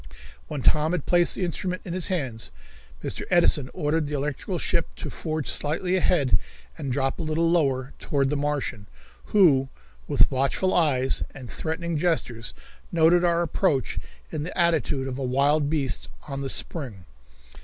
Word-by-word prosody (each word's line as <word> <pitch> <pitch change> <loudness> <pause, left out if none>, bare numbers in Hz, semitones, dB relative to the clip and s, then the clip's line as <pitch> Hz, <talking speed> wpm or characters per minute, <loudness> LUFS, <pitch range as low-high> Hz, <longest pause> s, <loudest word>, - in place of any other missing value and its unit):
When 145 -4 -4
Tom 155 +2 +3
had 180 - -2
placed 175 -1 +3
the 185 - -1
instrument 180 +1 -3
in 170 - -4
his 185 -2 -1
hands 135 - -2 0.5
Mr. - - -2
Edison 160 -6 +5
ordered 155 -2 0
the 150 - -3
electrical 150 +6 -2
ship 170 0 0
to - - -6
forge 155 -3 -3
slightly 170 +5 -1
ahead 170 -8 +3 0.4
and 135 - -4
drop 135 +1 0
a - - -2
little 160 +1 +1
lower 135 -6 +1
toward 140 -2 0
the 150 - 0
Martian, 140 -7 -2 0.4
who, 140 -10 +4 0.4
with - - +4
watchful 135 +8 +1
eyes 135 -6 +3
and 130 -3 -9
threatening 165 0 -2
gestures, 125 - -1 0.4
noted 170 +1 +4
our 170 -1 +3
approach 160 -5 0 0.3
in 155 - -3
the 165 - -5
attitude 160 -6 +1
of 130 0 -4
a - - -2
wild 140 +3 +2
beast 140 - 0 0.2
on 135 0 -4
the 135 - -3
spring. 120 - -4
150 Hz, 160 wpm, -25 LUFS, 135-170 Hz, 0.5 s, Edison